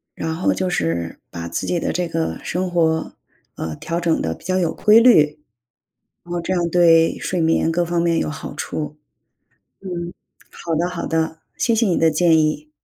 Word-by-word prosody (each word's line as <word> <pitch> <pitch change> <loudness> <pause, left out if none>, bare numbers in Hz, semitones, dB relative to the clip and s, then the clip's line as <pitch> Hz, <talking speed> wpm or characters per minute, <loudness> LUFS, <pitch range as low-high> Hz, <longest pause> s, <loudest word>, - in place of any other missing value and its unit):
呃， - - -4
然 160 - -2
后 175 - +1
就 185 -1 -1
是 85 - -2
把 85 -1 -6
自 - - -3
己 175 - 0
的 - - -1
这 180 -1 -1
个 165 0 -2
生 185 +1 -2
活， 160 -2 0 0.4
呃， 80 -1 -5
调 170 0 -3
整 170 -2 +1
的 80 - -1
比 - - -17
较 185 +1 0
有 170 -3 0
规 215 +2 +5
律。 155 -11 +5 0.9
然 175 - -9
后 175 - -1
这 170 - -3
样 175 -2 0
对 165 -1 +4
睡 180 - -2
眠 165 0 +2
各 175 +1 +1
方 170 0 -1
面 170 -1 +2
有 - - -1
好 145 - -7
处。 150 -1 -5 0.9
嗯， 175 -2 -5 0.4
好 165 -1 -4
的 170 +3 0
好 180 -1 -5
的， 160 0 -1 0.2
谢 235 - +1
谢 225 -1 +2
你 175 - +1
的 165 -1 +3
建 165 +1 +4
议。 155 -1 -1
165 Hz, 215 characters per minute, -20 LUFS, 160-175 Hz, 0.9 s, 规